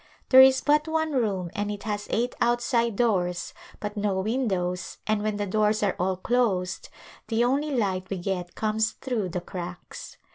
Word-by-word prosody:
There 260 0 +9
is 265 0 +6
but 300 +1 +2
one 320 0 0
room 200 - -1
and 205 0 -2
it 205 -1 -5
has 210 -2 -3
eight 240 +2 0
outside 235 -1 +1
doors 180 -7 0 0.3
but 210 0 -5
no 205 -2 0
windows 190 -6 -2
and 215 -1 +1
when 215 -1 -1
the 205 - -1
doors 215 +2 +1
are 200 - +1
all 185 +1 0
closed 190 -4 0 0.4
the 230 0 +1
only 275 +5 +1
light 190 -8 -1
we 195 - -2
get 180 -1 -4
comes 220 0 0
through 230 -8 -3
the 180 +1 -3
cracks. 180 -1 -8
210 Hz, 175 wpm, -26 LUFS, 185-240 Hz, 0.4 s, There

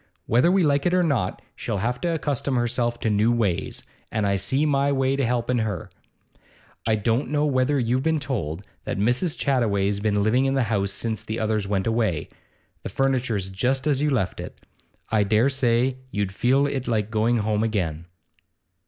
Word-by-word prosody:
Whether 125 +9 +3
we 190 -1 +3
like 145 0 +2
it 175 - +2
or 180 - +3
not, 130 - -1
she'll - - -3
have 120 +5 -2
to 175 - -1
accustom 140 -2 -1
herself 120 0 0
to 110 - +1
new 105 +3 +3
ways, 105 -7 -1 0.3
and 110 -2 0
I 100 0 +2
see 130 +10 +1
my 140 -1 +2
way 135 0 +1
to 135 - 0
helping 120 0 0
her. 105 -6 -3 1.0
I 110 - +3
don't 115 +5 0
know 150 0 +1
whether 140 0 +2
you've 125 0 +1
been 160 +1 +1
told 100 - -4 0.2
that - - -3
Mrs. 125 - +1
Chattaway's 105 -7 +1
been 105 -1 +1
living 125 +5 +3
in 135 0 +1
the 135 - +2
house 100 -1 0
since 110 +2 -3
the 110 - -4
others 110 -2 0
went 95 -1 0
away. 110 -8 0 0.5
The - - -5
furniture's 125 -8 0
just 130 +8 0
as 145 -2 +1
you 150 - +2
left 115 -10 -1
it; - - -9 0.4
I 110 -1 +2
dare 110 +6 +3
say 130 -1 +1
you'd 100 -5 -2
feel 130 +6 +2
it 135 -2 -3
like 110 -3 0
going 115 +2 +2
home 105 -1 0
again. 90 -8 -1
120 Hz, 190 wpm, -24 LUFS, 105-135 Hz, 1.0 s, Whether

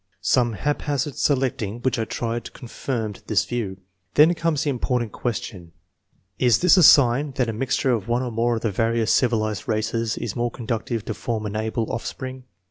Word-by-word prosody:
Some 120 -2 +2
haphazard 145 +3 -1
selecting 125 -6 0
which 130 -2 +1
I 110 - 0
tried 115 +1 -4
confirmed 115 -3 -5
this - - +2
view. 110 -6 -3 0.4
Then 155 +4 +6
comes 165 -3 0
the 145 - 0
important 125 -3 -1
question, 100 -8 -5 0.7
Is 120 -3 +4
this 180 +8 +5
a 185 - +5
sign 140 -1 +6
that 125 -2 0
a - - -2
mixture 130 +3 0
of 110 -6 -1
one 120 +2 +1
or 125 - -3
more 115 +1 +1
of 115 - -5
the 115 - +1
various 115 +1 +1
civi 120 -3 +2
lized 110 -1 -3
races 110 0 -1
is 115 -4 -3
conducive. 115 -1 -3
to - - -3
form 110 -2 -3
an 105 0 -4
able 110 +1 -1
oflF 110 - -4
spring? 130 -1 -7
120 Hz, 185 wpm, -23 LUFS, 110-130 Hz, 0.7 s, Then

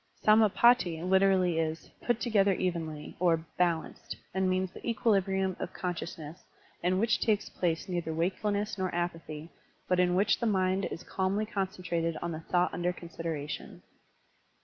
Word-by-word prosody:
Sam^patti 215 -5 +4
literally 190 -3 +3
is 160 0 -3
"put 240 -2 0
together 205 -5 +3
evenly" 165 -5 -3
or 165 -2 +2
"balanced," 170 -3 -1 0.2
and 190 0 +1
means 185 0 0
the - - -10
equilibrivmi 195 -5 +1
of - - -5
consciousness 170 -2 -5 0.4
in 180 +2 +2
which 220 +2 +2
takes 210 -2 +1
place 170 -1 -1
neither 175 -3 -2
wakefulness 200 +5 -1
nor 185 0 0
apathy, 165 -2 -4 0.4
but 180 0 +2
in 180 0 +3
which 200 +3 +3
the 235 - 0
mind 190 -2 +1
is 170 - -5
calmly 195 +3 -1
concentrated 180 -5 -2
on 170 - -3
the 160 - -4
thought 175 +2 +1
tmder 180 +1 -1
consideration. 160 -3 -6
180 Hz, 145 wpm, -30 LUFS, 170-195 Hz, 0.4 s, Sam^patti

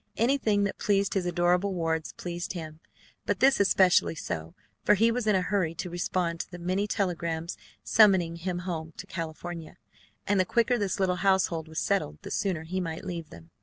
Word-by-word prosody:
Anything 225 -4 +2
that 200 - -2
pleased 200 -1 +1
his 185 -3 0
adorable 180 +3 +2
wards 165 -2 -1
pleased 175 +1 -5
him, 160 -3 -7 0.5
but - - 0
this 270 +1 +5
especially 190 -4 +4
so, 80 - -5 0.3
for - - +5
he 225 +4 +4
was 235 -1 -2
in 210 - +4
a 185 - +2
hurry 180 -4 0
to 180 0 -5
respond 175 -1 -1
to - - -4
the 175 - -8
many 185 +4 -1
telegrams 170 -5 -2 0.3
summoning 190 -6 +4
him 175 +1 -3
home 160 -3 -4
to - - -7
California, 165 0 -6 0.5
and 200 -1 +2
the - - +5
quicker 235 +5 +2
this 200 -2 -1
little 185 -2 +1
household 185 -4 +1
was 160 0 -10
settled, 180 - 0
the - - -7
sooner 185 -6 -1
he 185 +4 -3
might 165 -1 -5
leave 170 -4 -5
them. 85 -1 -14
180 Hz, 190 wpm, -28 LUFS, 165-200 Hz, 0.5 s, this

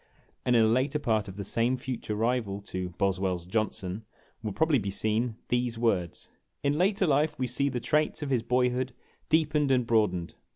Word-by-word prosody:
And 125 - +3
in 115 -1 +6
a - - +4
later 130 +6 +2
part 110 -7 0
of 95 - -8
the 100 - -5
same 120 +6 +1
future 125 -5 -4
rival 110 -3 0
to 95 -2 -4
" 90 - -24
Boswell's 95 -2 0
Johnson" 100 0 -2 0.4
will 110 -2 -3
probably 155 +4 +2
be 100 -2 -3
seen 110 +4 0
these 120 -1 0
words: 100 -7 0 0.4
"In 140 0 +2
later 190 +4 +2
life 150 0 +2
we 130 - 0
see 135 +3 0
the 125 - -2
traits 150 +5 0
of 140 - -3
his 125 -3 +2
boyhood 125 +1 0 0.3
deepened 150 -2 +2
and 125 -2 +3
broadened. 105 -7 +1
120 Hz, 190 wpm, -28 LUFS, 105-135 Hz, 0.4 s, in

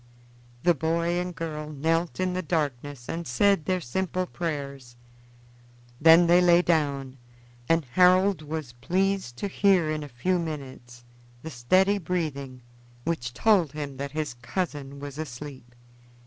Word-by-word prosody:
The 175 - +5
boy 170 +3 0
and 180 -1 -4
girl 155 -2 -5
knelt 165 +4 -1
in 185 -1 0
the 185 - -1
darkness 145 -6 -3
and 170 0 -4
said 190 +7 +2
their 185 +1 +1
simple 185 +5 -2
prayers. 140 -8 -5 1.0
Then 165 +2 +7
they 175 +1 +5
lay 175 0 +5
down, 140 -6 0 0.5
and 165 -2 +3
Harold 185 +5 +4
was 155 -4 -5
pleased 185 +1 -1
to 205 - -2
hear 190 -5 +3
in 155 0 -2
a 145 - -7
few 180 +9 0
minutes 130 -7 -7 0.4
the 160 - -6
steady 185 +11 +2
breathing 145 -8 -4 0.4
which 125 -7 -2
told 195 -10 +3
him 145 -3 -5
that 140 +1 -4
his 155 -3 -2
cousin 140 -2 -4
was 145 +1 -8
asleep. 130 -4 -8
155 Hz, 140 wpm, -26 LUFS, 140-180 Hz, 1.0 s, Then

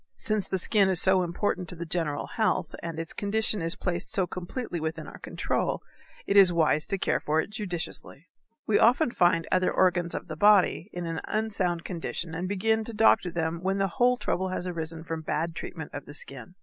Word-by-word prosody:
Since 215 -3 -1
the 190 - -1
skin 195 +1 +3
is 185 -3 +3
so 190 0 +4
important 180 0 -2
to - - -4
the 170 0 -6
general 160 -3 -1
health 215 -6 0
and 165 -1 -5
its 165 0 -3
condition 210 -1 0
is 165 +1 +1
placed 175 -2 -3
so 190 - +4
completely 180 +2 -5
within 160 0 -4
our - - -10
control, - - -2 0.4
it 200 - 0
is 195 -3 +8
wise 155 -2 +2
to 195 - -1
care - - +1
for 155 +1 0
it 180 - -2
judiciously. 180 -6 -5 0.4
We 210 - +3
often 245 +3 +4
find 175 -5 +2
other 185 0 +3
organs 175 -2 +2
of - - -5
the 155 - -5
body 205 0 +4
in 175 -1 -5
an 165 -1 -3
unsound 195 -6 -1
condition 170 -1 -4
and 180 +3 -3
begin 220 +3 +1
to 230 - -7
doctor 210 -4 +4
them 165 0 -2
when 190 +1 0
the 195 0 +1
whole 245 +7 +2
trouble 190 -5 -1
has 185 -1 -3
arisen 165 -2 -4
from 165 -1 -4
bad 160 +1 -2
treatment 160 -2 -7
of 145 - -7
the 145 - -9
skin. 140 +6 -7
180 Hz, 205 wpm, -27 LUFS, 165-200 Hz, 0.4 s, is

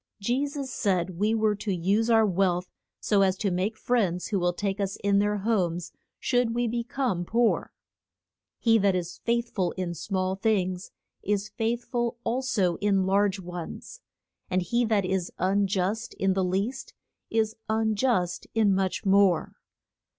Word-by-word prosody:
Je 245 +8 0
sus 280 -2 -5
said 185 -5 0
we 215 +2 +2
were 215 -1 +2
to 205 0 -4
use 195 +6 +1
our 225 -1 +5
wealth 180 -2 0 0.3
so 205 -2 +2
as 190 -1 +2
to 200 -1 -1
make 190 +5 -1
friends 195 -9 0
who 200 - 0
will 175 0 +2
take 195 +2 -3
us 195 -1 -1
in 200 0 +3
their 205 +1 +1
homes 185 -5 -1 0.3
should 245 -2 +1
we 240 0 +1
be 235 +1 -1
come 235 -8 -1
poor. 230 +5 +1 0.9
He 225 -1 +4
that 195 -2 +3
is 175 -1 -4
faith 235 0 -1
ful 185 -4 0
in 180 -2 -3
small 185 +3 -2
things 190 -3 0 0.3
is 205 0 -1
faith 235 +1 -2
ful 240 -1 -2
al 245 +3 0
so 195 -10 +1
in 195 -2 +2
large 195 0 +2
ones. 180 - -8 0.5
And 185 0 +1
he 235 +7 +1
that 215 -4 +1
is 185 -1 -1
un 195 +2 +2
just 195 +4 -2
in 195 0 +1
the 190 0 +1
least, 195 +8 -2 0.3
is 220 0 0
un 220 0 +1
just 200 -6 0
in 215 -3 +4
much 190 0 -1
more. 195 -3 +4
200 Hz, 170 wpm, -27 LUFS, 185-225 Hz, 0.9 s, our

